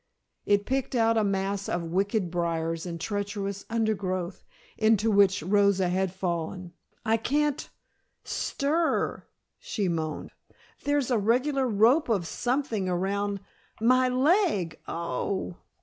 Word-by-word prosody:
It 205 0 +3
picked 265 0 -1
out 230 -1 +3
a 220 - +3
mass 195 0 -1
of 175 - -1
wicked 195 0 0
briars 165 -1 -1
and 170 -1 -5
treacherous 200 0 -3
undergrowth 195 -5 -1 0.3
into 220 0 +3
which 200 -1 +4
Rosa 200 0 +3
had 190 0 0
fallen. 180 -1 -3 0.3
"I 225 0 +3
can't 290 +5 0 0.5
stir 315 +4 -1
" - - -54
she 205 -4 -2
moaned. 160 -2 -3 0.5
"There's 285 -3 +1
a 235 - +3
regular 255 +6 +2
rope 235 +7 +4
of 200 -7 +1
something 235 - -1
around 200 +2 -1 0.4
my 255 +3 +4
leg. 260 - +2
Oh 170 +3 -2
h - - -9
h!" - - -24
205 Hz, 130 wpm, -27 LUFS, 185-240 Hz, 0.5 s, which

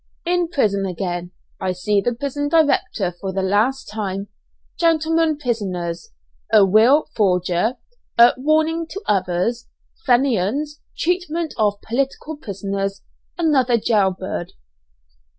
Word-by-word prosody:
IN 350 0 +1
PRISON 210 - +1
AGAIN 175 -1 -4 0.3
I 185 -1 -1
SEE 200 +3 +1
THE 240 +4 -1
PRISON 285 +3 -3
DIRECTOR 285 - +2
FOR 195 -1 -3
THE 190 0 -2
LAST 215 +8 +1
TIME 200 -2 -4 0.5
GENTLEMEN 325 -1 +2
PRISONERS 185 - -3 0.4
A 210 -2 +7
WILL 225 +10 +5
FORGER 180 +2 +1 0.4
A 235 +1 +8
"WARNING 315 +4 +1
TO 390 - -6
OTHERS" 200 +5 0 0.4
FENIANS 265 +4 +1 0.2
TREATMENT 340 -2 -1
OF 205 -2 +1
POLITICAL 275 +5 -2
PRISONERS 195 -3 -4 0.3
ANOTHER 270 -8 +3
JAILBIRD. 190 -5 -1
225 Hz, 110 wpm, -21 LUFS, 195-295 Hz, 0.5 s, A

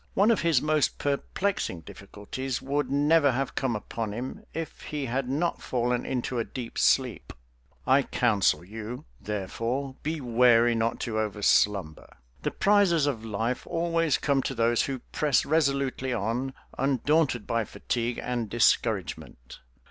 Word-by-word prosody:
One 205 +4 +5
of 225 - +2
his 165 -6 +2
most 155 -1 +1
perplexing 145 - -2
difficulties 105 +9 -6
would 145 +2 -1
never 145 0 +4
have 135 +2 -2
come 130 -4 -1
upon 105 0 -4
him 125 +4 -6
if 165 0 -6
he 150 -2 -4
had 130 +1 -2
not 155 +6 -1
fallen 125 0 -1
into 125 -1 -2
a - - +1
deep 120 0 -6
sleep. 130 -4 +2 0.5
I - - +5
counsel 100 -3 +1
you, 110 +4 -7 0.2
therefore, 115 +7 -3
be 155 +1 -2
wary 120 -2 +4
not 115 0 0
to 110 -2 -2
overslumber. 100 -5 +1 0.2
The - - 0
prizes 195 -7 +3
of 125 -6 -2
life 115 +3 -2
always 165 -2 +1
come 140 -2 +1
to - - -3
those 115 0 +2
who 135 -3 -4
press 150 -3 +2
resolutely 140 -4 +1
on, 120 +4 -2 0.2
undaunted 135 -1 +1
by 115 -1 0
fatigue 120 +2 -3
and 120 -3 -2
discouragement. 100 - 0
125 Hz, 140 wpm, -27 LUFS, 115-145 Hz, 0.5 s, One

